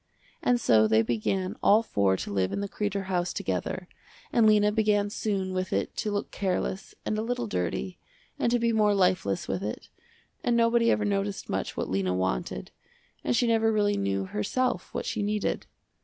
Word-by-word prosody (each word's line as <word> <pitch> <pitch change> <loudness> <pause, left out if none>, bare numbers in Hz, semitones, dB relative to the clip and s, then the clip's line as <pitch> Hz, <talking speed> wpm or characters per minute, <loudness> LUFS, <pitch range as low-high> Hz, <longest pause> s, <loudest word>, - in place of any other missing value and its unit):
And 245 -1 +2
so 110 - +4
they 110 +1 +4
began 120 - -1
all 215 +3 +5
four 100 - +1
to 100 - -5
live 95 -1 +1
in - - -2
the 200 - -2
Kreder 200 -1 -2
house 180 -2 -1
together, 95 - -3 0.5
and 230 -2 +5
Lena 210 -1 +5
began 210 -1 +2
soon 195 -3 -2
with 185 0 -2
it 100 +1 -1
to 215 - -1
look 205 -1 -2
careless 190 0 -2
and 215 - -1
a - - 0
little 235 - -2
dirty, 90 - -3 0.4
and 235 - +2
to 245 - +4
be 235 -1 +1
more 210 -2 +3
lifeless 180 - +1
with 95 - -2
it, 105 +2 -5 0.5
and 240 -1 +2
nobody 230 0 +4
ever 210 - +2
noticed 200 -1 -2
much - - -3
what - - -1
Lena 95 -1 0
wanted, 60 -9 -2 0.5
and 125 - +1
she - - +3
never 225 -1 +3
really 205 -1 +2
knew 95 -1 -1
herself 250 - -1
what - - -4
she 230 -4 -2
needed. 210 0 -1
195 Hz, 185 wpm, -27 LUFS, -, 0.5 s, all